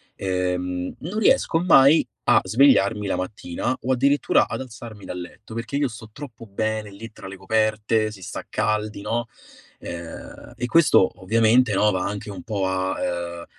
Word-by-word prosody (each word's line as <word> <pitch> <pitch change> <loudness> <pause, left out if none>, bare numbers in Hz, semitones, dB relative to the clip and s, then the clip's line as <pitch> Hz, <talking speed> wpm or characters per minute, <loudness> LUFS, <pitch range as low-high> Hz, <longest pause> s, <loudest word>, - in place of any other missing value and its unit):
ehm, 90 -1 -2
non 180 +7 -5
riesco 220 -5 +3
mai 155 -3 +5 0.2
a - - +6
svegliarmi 105 -2 +3
la - - 0
mattina 90 +5 -3
o 130 - 0
addirittura 140 +3 +3
ad - - -4
alzarmi 115 -5 -10
dal 90 - -6
letto, 95 +5 -11
perché 115 +5 -3
io 145 -1 +1
sto 110 -2 -10
troppo 125 -5 -10
bene 110 0 -3
lì 115 +3 -10
tra 100 - -11
le 95 0 -9
coperte, 110 +1 +1
si 100 -2 -12
sta 90 - -7
caldi, 110 -1 -1
no, 115 +3 -2 0.5
ehm, 85 +6 -9
e 125 - -2
questo 145 - +4
ovviamente, 115 +3 +3
no, 105 +2 +3
va 95 -2 -1
anche 100 +1 -5
un 95 -3 -8
po' 105 -4 -2
a, 95 0 -1 0.5
uhm, 85 - -9
110 Hz, 170 wpm, -23 LUFS, 95-120 Hz, 0.5 s, a